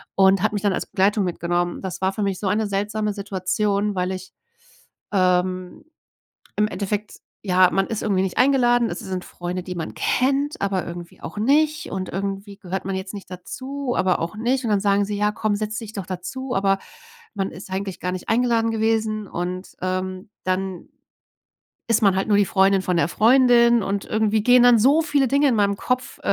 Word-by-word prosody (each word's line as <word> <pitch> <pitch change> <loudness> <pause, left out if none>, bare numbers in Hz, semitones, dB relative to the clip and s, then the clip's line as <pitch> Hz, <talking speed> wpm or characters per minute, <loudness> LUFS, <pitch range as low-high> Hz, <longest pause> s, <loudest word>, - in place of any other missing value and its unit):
und 190 -1 +4
hat 215 0 +1
mich 205 - -3
dann 200 -2 +2
als - - -3
Begleitung 200 +2 +2
mitgenommen. 175 0 -1
Das 185 -1 -5
war 190 0 +1
für 210 - -2
mich 195 -2 -1
so 205 - -2
eine 210 +3 +1
seltsame 205 +1 -1
Situation, 200 +1 -1
weil 180 0 -1
ich, 185 0 -8 0.8
ähm, 185 +5 0 0.7
im 210 0 +2
Endeffekt, 205 +1 -3 0.3
ja, 185 -2 +4
man 195 0 +1
ist 225 - -4
irgendwie 195 -3 +1
nicht 190 -2 -3
eingeladen. 245 -4 +3
Es 175 - -4
sind 185 -1 -5
Freunde, 180 +1 -5
die 180 0 -6
man 165 -2 -5
kennt, 275 +3 0
aber 195 -2 -1
irgendwie 170 0 -9
auch - - -7
nicht. 300 +7 +2
Und 185 -1 -4
irgendwie 195 +1 -4
gehört 190 -1 -5
man 195 - -2
jetzt 190 +2 -6
nicht 200 -2 -9
dazu, 260 +8 -5
aber 185 -1 +2
auch 170 +6 -4
nicht. 250 +4 0
Und 230 - -1
dann 205 -1 +2
sagen 200 0 +2
sie 210 - -3
ja, 210 +1 +1
komm, 215 -1 -1
setz 215 +1 -3
dich 220 -2 -8
doch 195 - -4
dazu. 250 +8 -5
Aber 195 0 +2 0.6
man 195 -1 -2
ist 185 +3 -11
eigentlich 190 0 -4
gar 180 0 -2
nicht 185 - -6
eingeladen 230 -1 +2
gewesen. 220 -1 0
Und, 180 +2 -4
ähm, 185 +1 -3 0.2
dann 185 -1 -2 1.0
ist 230 -1 +2
man 195 -3 +4
halt 190 - 0
nur 205 -1 +4
die 205 - +3
Freundin 195 0 +3
von 180 -1 0
der 160 -3 +3
Freundin. 235 +1 +5
Und 200 0 -2
irgendwie 215 0 +1
gehen 245 +2 +6
dann 245 -1 +7
so 280 +8 +5
viele 290 -4 +1
Dinge 280 +3 +3
in 255 - +2
meinem 200 -1 +2
Kopf 250 +4 -2
200 Hz, 195 wpm, -22 LUFS, 185-225 Hz, 1.0 s, dann